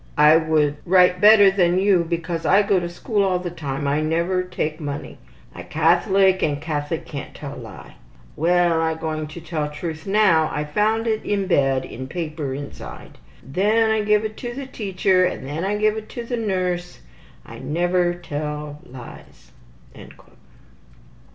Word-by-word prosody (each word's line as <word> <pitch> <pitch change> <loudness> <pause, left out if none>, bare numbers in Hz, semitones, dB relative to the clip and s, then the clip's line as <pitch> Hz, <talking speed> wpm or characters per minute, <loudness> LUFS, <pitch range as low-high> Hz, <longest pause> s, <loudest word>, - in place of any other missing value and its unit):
I 150 +2 +7
could 155 -2 +1
write 180 0 +4
better 205 -2 +8
than 180 -2 +2
you 190 -2 +3
because 165 0 -3
I 200 +2 +4
go 200 -2 +2
to 175 -1 -4
school 205 +4 -2
all 185 -2 +1
the 180 -1 -5
time. 140 -4 -4
I 145 +2 +1
never 170 +4 0
take 170 -4 -4
money. 145 -2 -6 0.3
I - - -9
Catholic 185 +4 +2
and 145 -2 0
Catholic 150 0 -3
can't 140 -3 -8
tell 145 -1 -7
lie. 110 -5 -11 0.4
Well, 175 0 +2
I 160 0 0
going 155 -1 -4
to 155 +3 -9
tell 160 -2 -3
the 150 - -11
truth 160 +2 -6
now. 195 -6 +3
I 150 - -2
found 215 +9 0
it 220 -1 -1
in 200 -1 -1
bed, 135 -7 +1
in 130 +2 -8
paper 155 -3 -4
inside. 140 +1 -9 0.2
Then 210 +10 +1
I 220 0 +1
give 210 +1 +2
it 215 0 -5
to 245 +3 -6
teacher 190 -6 +1
and 180 - -2
then 150 +5 -4
I 205 +2 -1
give 215 0 +2
it 215 0 -8
to 240 0 -5
nurse. 185 - -2 0.4
I - - -11
never 175 +2 0
tell 150 -3 -5
lies.'' 125 -1 -13
175 Hz, 165 wpm, -22 LUFS, 150-195 Hz, 0.4 s, better